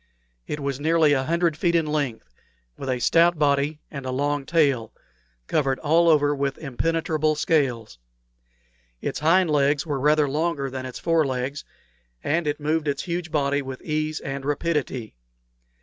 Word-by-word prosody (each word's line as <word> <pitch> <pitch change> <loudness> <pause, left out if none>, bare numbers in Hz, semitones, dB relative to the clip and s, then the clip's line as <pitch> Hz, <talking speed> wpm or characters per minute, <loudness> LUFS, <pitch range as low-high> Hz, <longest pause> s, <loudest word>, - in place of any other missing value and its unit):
It 150 - -4
was 140 -1 -3
nearly 160 0 +3
a 135 -1 0
hundred 170 0 +1
feet 170 +2 +1
in 165 -2 +3
length, 140 - -3 0.4
with 135 - -6
a 130 - +1
stout 170 +7 +3
body 145 +1 +1
and 140 -3 -6
a 130 - -4
long 145 +1 -1
tail, 140 -9 +2 0.5
covered 135 - 0
all 165 +2 +3
over 145 -2 +4
with 140 -1 -2
impenetrable 155 +2 -1
scales. 135 - 0 1.0
It - - -3
hind 170 +2 +3
legs 145 0 +2
were 145 -4 -2
rather 150 +1 +3
longer 145 -1 -1
than 130 0 -5
its 130 - -7
fore 165 -3 +2
legs, 130 +2 -3 0.6
and 160 +1 0
it 145 - -1
moved 155 +1 -1
its 140 -1 -1
huge 170 0 -3
body 145 -2 0
with 130 -1 -7
ease 155 0 -2
and 135 0 -5
rapidity. 145 -5 -2
145 Hz, 160 wpm, -24 LUFS, 135-160 Hz, 1.0 s, over